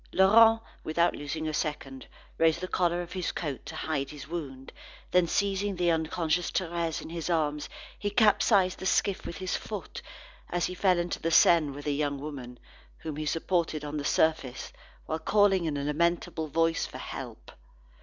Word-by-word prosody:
Laurent, 225 Hz, +4 st, +6 dB, 0.2 s
without 170 Hz, +2 st, +1 dB
losing 155 Hz, +2 st, -4 dB
a 155 Hz, -, -2 dB
second, 140 Hz, -4 st, -4 dB, 0.3 s
raised 165 Hz, 0 st, +4 dB
the 185 Hz, -, -4 dB
collar 175 Hz, -1 st, 0 dB
of 175 Hz, -, -12 dB
his 185 Hz, -2 st, -2 dB
coat 140 Hz, -8 st, -4 dB
to 160 Hz, -, -7 dB
hide 150 Hz, -4 st, -2 dB
his 145 Hz, -2 st, -9 dB
wound. 140 Hz, -6 st, -6 dB, 0.4 s
Then 180 Hz, -1 st, +4 dB
seizing 200 Hz, +2 st, 0 dB
the 175 Hz, -1 st, +2 dB
unconscious 165 Hz, +1 st, 0 dB
Thérèse 170 Hz, -3 st, -2 dB
in -, -, -9 dB
his 170 Hz, 0 st, -4 dB
arms, 150 Hz, -3 st, 0 dB, 0.3 s
he 205 Hz, -, -1 dB
capsized 205 Hz, -3 st, +3 dB
the 190 Hz, -, -2 dB
skiff 195 Hz, 0 st, +1 dB
with 170 Hz, -, -6 dB
his 185 Hz, +1 st, -2 dB
foot, -, -, -6 dB, 0.5 s
as 175 Hz, -1 st, 0 dB
he 180 Hz, -, -3 dB
fell 185 Hz, -1 st, +2 dB
into 175 Hz, 0 st, -2 dB
the 165 Hz, -, 0 dB
Seine 165 Hz, -2 st, +5 dB
with 140 Hz, +1 st, -8 dB
the 145 Hz, -, 0 dB
young 145 Hz, -1 st, -1 dB
woman, 135 Hz, -4 st, -7 dB, 0.4 s
whom 155 Hz, -2 st, -6 dB
he 155 Hz, +1 st, -4 dB
supported 165 Hz, -2 st, -1 dB
on 150 Hz, +1 st, -4 dB
the 145 Hz, -, -3 dB
surface, 145 Hz, -4 st, 0 dB, 0.3 s
whilst 160 Hz, +1 st, -4 dB
calling 200 Hz, -4 st, +4 dB
in 150 Hz, -3 st, -1 dB
a 140 Hz, -, -3 dB
lamentable 160 Hz, +1 st, 0 dB
voice 165 Hz, +2 st, +1 dB
for -, -, -9 dB
help. -, -, -8 dB
165 Hz, 180 wpm, -28 LUFS, 150-180 Hz, 0.5 s, Laurent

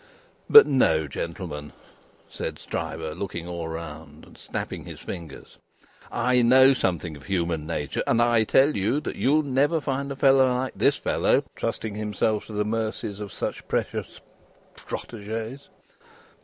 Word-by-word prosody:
But, 440 Hz, -, +11 dB
no, 80 Hz, -, +2 dB
gentlemen," 75 Hz, -1 st, -6 dB, 0.5 s
said -, -, -5 dB
Stryver, 80 Hz, -1 st, -4 dB
looking 85 Hz, -1 st, -5 dB
all 85 Hz, -2 st, -4 dB
round, 80 Hz, -2 st, -8 dB
and -, -, -17 dB
snapping -, -, -6 dB
his -, -, -9 dB
fingers, 80 Hz, -5 st, -9 dB, 0.5 s
"I 125 Hz, 0 st, +2 dB
know 130 Hz, +3 st, +7 dB
something 85 Hz, -, -1 dB
of 75 Hz, -, -13 dB
human 85 Hz, -5 st, -1 dB
nature, 75 Hz, -4 st, -2 dB
and 115 Hz, -, +3 dB
I 120 Hz, -1 st, +4 dB
tell 140 Hz, +7 st, +4 dB
you 105 Hz, +9 st, +1 dB
that -, -, -5 dB
you'll 150 Hz, +4 st, +2 dB
never 145 Hz, +4 st, +2 dB
find 140 Hz, 0 st, -3 dB
a -, -, -3 dB
fellow 135 Hz, -1 st, +5 dB
like 130 Hz, +1 st, -2 dB
this -, -, +3 dB
fellow, -, -, +1 dB
trusting 110 Hz, -2 st, -3 dB
himself 105 Hz, 0 st, -1 dB
to 110 Hz, -, -9 dB
the 105 Hz, 0 st, 0 dB
mercies 110 Hz, -2 st, -3 dB
of 105 Hz, -2 st, -6 dB
such -, -, -5 dB
precious -, -, -3 dB, 0.6 s
protégés. 115 Hz, +4 st, -6 dB
105 Hz, 145 wpm, -25 LUFS, 85-130 Hz, 0.6 s, But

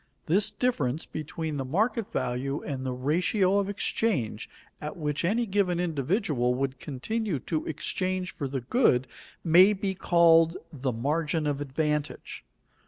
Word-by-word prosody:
This 195 Hz, +6 st, +3 dB
difference 155 Hz, -, -1 dB
between 155 Hz, 0 st, -5 dB
the 135 Hz, -, -2 dB
market 215 Hz, -, 0 dB
value 130 Hz, +3 st, -2 dB
and 135 Hz, -3 st, -4 dB
the 130 Hz, -, -2 dB
ratio 180 Hz, -, +1 dB
of 200 Hz, 0 st, -1 dB
exchange 185 Hz, -, -1 dB, 0.3 s
at 150 Hz, +3 st, -5 dB
which 150 Hz, -2 st, -2 dB
any 225 Hz, +7 st, +1 dB
given 190 Hz, -4 st, +1 dB
individual 150 Hz, -, 0 dB
would 135 Hz, 0 st, -2 dB
continue 175 Hz, -, -2 dB
to 155 Hz, +3 st, -3 dB
exchange 185 Hz, +4 st, -2 dB
for 145 Hz, -, -4 dB
the 135 Hz, -1 st, -3 dB
good 130 Hz, -, +3 dB, 0.4 s
may 180 Hz, +5 st, +7 dB
be 195 Hz, -1 st, -2 dB
called 165 Hz, -2 st, +4 dB, 0.2 s
the 135 Hz, -2 st, -2 dB
margin 150 Hz, +6 st, -1 dB
of 145 Hz, -1 st, -1 dB
advantage. 150 Hz, +1 st, -2 dB
160 Hz, 140 wpm, -27 LUFS, 135-190 Hz, 0.4 s, may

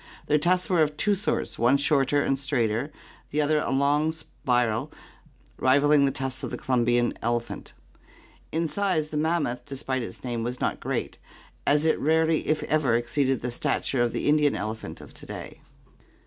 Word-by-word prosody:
Their 150 Hz, 0 st, +3 dB
tusks 180 Hz, +3 st, +1 dB
were 175 Hz, -4 st, +3 dB
of 150 Hz, -1 st, +1 dB
two 210 Hz, -, +2 dB
sorts, 200 Hz, +1 st, -2 dB
one 120 Hz, +4 st, +4 dB
shorter 145 Hz, 0 st, +2 dB
and 135 Hz, -1 st, 0 dB
straighter, 130 Hz, -1 st, 0 dB, 0.4 s
the 150 Hz, -, -1 dB
other 150 Hz, +1 st, +3 dB
a -, -, -2 dB
long 145 Hz, +3 st, +2 dB
spiral 125 Hz, -7 st, -1 dB, 0.7 s
rivalling 140 Hz, +2 st, +4 dB
the 135 Hz, -, +2 dB
tusks 130 Hz, -1 st, -3 dB
of -, -, -4 dB
the -, -, -5 dB
Columbian 120 Hz, -1 st, +1 dB
elephant. 120 Hz, 0 st, -3 dB, 0.8 s
In 165 Hz, +1 st, 0 dB
size 180 Hz, -4 st, 0 dB
the 150 Hz, -, -4 dB
mammoth, 150 Hz, -6 st, 0 dB
despite 135 Hz, -1 st, -3 dB
its 115 Hz, -, -7 dB
name, 120 Hz, -2 st, -3 dB
was 125 Hz, +2 st, -4 dB
not -, -, -1 dB
great, -, -, -3 dB, 0.5 s
as 150 Hz, +2 st, +3 dB
it 160 Hz, -, +2 dB
rarely 160 Hz, +1 st, +2 dB
if 155 Hz, -, +1 dB
ever 150 Hz, -6 st, +2 dB
exceeded 130 Hz, +2 st, 0 dB
the 125 Hz, -, -2 dB
stature 135 Hz, 0 st, -1 dB
of 120 Hz, -1 st, +2 dB
the -, -, -2 dB
Indian 150 Hz, -1 st, +3 dB
elephant 110 Hz, +1 st, -5 dB
of -, -, -13 dB
to -, -, -12 dB
day. -, -, -8 dB
140 Hz, 175 wpm, -26 LUFS, 125-155 Hz, 0.8 s, one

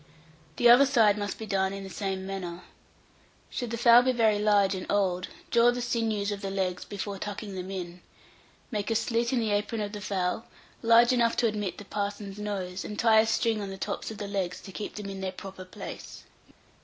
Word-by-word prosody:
The 240 Hz, -, +4 dB
other 250 Hz, +4 st, +8 dB
side 225 Hz, -6 st, +4 dB
must 205 Hz, -1 st, -3 dB
be 220 Hz, -, -6 dB
done 190 Hz, -2 st, 0 dB
in 195 Hz, 0 st, -6 dB
the 195 Hz, -, -7 dB
same 190 Hz, -2 st, -3 dB
manner. 180 Hz, -2 st, -5 dB, 0.9 s
Should 245 Hz, -, -3 dB
the 230 Hz, -, -3 dB
fowl 235 Hz, +1 st, +7 dB
be 255 Hz, +1 st, +2 dB
very 220 Hz, -4 st, +3 dB
large 205 Hz, -2 st, +3 dB
and 185 Hz, -1 st, -4 dB
old, 185 Hz, -3 st, +1 dB, 0.2 s
draw 235 Hz, 0 st, +6 dB
the 245 Hz, 0 st, 0 dB
sinews 225 Hz, -4 st, -1 dB
of 200 Hz, -1 st, -4 dB
the 195 Hz, -, -3 dB
legs 185 Hz, -2 st, -2 dB
before 200 Hz, -1 st, -5 dB
tucking 205 Hz, 0 st, -5 dB
them 185 Hz, 0 st, -5 dB
in. 180 Hz, -2 st, -6 dB, 0.7 s
Make 210 Hz, -1 st, -2 dB
a 225 Hz, -, +1 dB
slit 230 Hz, +1 st, +1 dB
in 255 Hz, -, +2 dB
the 220 Hz, -2 st, 0 dB
apron 205 Hz, +2 st, 0 dB
of 205 Hz, -1 st, -3 dB
the 210 Hz, -1 st, -7 dB
fowl, 195 Hz, +1 st, -2 dB, 0.3 s
large 235 Hz, +2 st, +6 dB
enough 235 Hz, -2 st, +2 dB
to 235 Hz, -, +3 dB
admit 205 Hz, -5 st, -3 dB
the 205 Hz, -, -9 dB
parson's 205 Hz, 0 st, -4 dB
nose, 190 Hz, -3 st, -4 dB
and 210 Hz, -, -6 dB
tie 225 Hz, -1 st, +5 dB
a 220 Hz, -, +3 dB
string 225 Hz, -1 st, +1 dB
on 200 Hz, -, -4 dB
the 195 Hz, -, -7 dB
tops -, -, -4 dB
of 220 Hz, -, -7 dB
the 205 Hz, -, -5 dB
legs 190 Hz, -3 st, -2 dB
to 195 Hz, -, -10 dB
keep 205 Hz, +2 st, -6 dB
them 210 Hz, -1 st, -6 dB
in 195 Hz, -1 st, -6 dB
their 190 Hz, -1 st, -2 dB
proper 190 Hz, 0 st, -9 dB
place. 185 Hz, -, -9 dB
205 Hz, 215 wpm, -28 LUFS, 195-225 Hz, 0.9 s, other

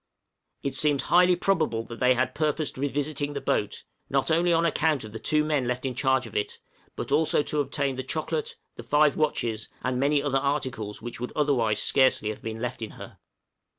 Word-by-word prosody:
It 140 Hz, -, -2 dB
seems 145 Hz, 0 st, +2 dB
highly 180 Hz, +1 st, +5 dB
probable 155 Hz, -, 0 dB
that 115 Hz, 0 st, -9 dB
they 125 Hz, 0 st, +4 dB
had 130 Hz, +1 st, 0 dB
purposed 155 Hz, 0 st, -1 dB
revisiting 145 Hz, +1 st, -2 dB
the 140 Hz, -, -3 dB
boat, 105 Hz, -, -1 dB, 0.3 s
not 135 Hz, +3 st, +1 dB
only 170 Hz, +2 st, +3 dB
on 165 Hz, 0 st, +3 dB
account 155 Hz, -4 st, +1 dB
of 110 Hz, -, -9 dB
the 110 Hz, -, -7 dB
two 150 Hz, +5 st, +2 dB
men 150 Hz, -5 st, 0 dB
left 125 Hz, +1 st, -2 dB
in 130 Hz, -, -1 dB
charge 130 Hz, -1 st, +1 dB
of 115 Hz, -, -11 dB
it, 105 Hz, -, -2 dB, 0.4 s
but -, -, -5 dB
also 150 Hz, 0 st, +3 dB
to 150 Hz, -, -1 dB
obtain 140 Hz, -1 st, -2 dB
the -, -, -1 dB
chocolate, 450 Hz, -, -3 dB, 0.2 s
the -, -, -6 dB
five 150 Hz, 0 st, +3 dB
watches, 115 Hz, -8 st, -1 dB
and 130 Hz, -1 st, -1 dB
many 140 Hz, +1 st, +2 dB
other 135 Hz, -2 st, +1 dB
articles 130 Hz, -7 st, -3 dB
which 120 Hz, -1 st, -6 dB
would 125 Hz, -, -4 dB
otherwise 125 Hz, -8 st, +2 dB
scarcely 130 Hz, -5 st, +3 dB
have 110 Hz, -, -6 dB
been 110 Hz, 0 st, -5 dB
left 125 Hz, +1 st, -4 dB
in 110 Hz, -, -4 dB
her. -, -, -11 dB
140 Hz, 200 wpm, -26 LUFS, 125-150 Hz, 0.4 s, highly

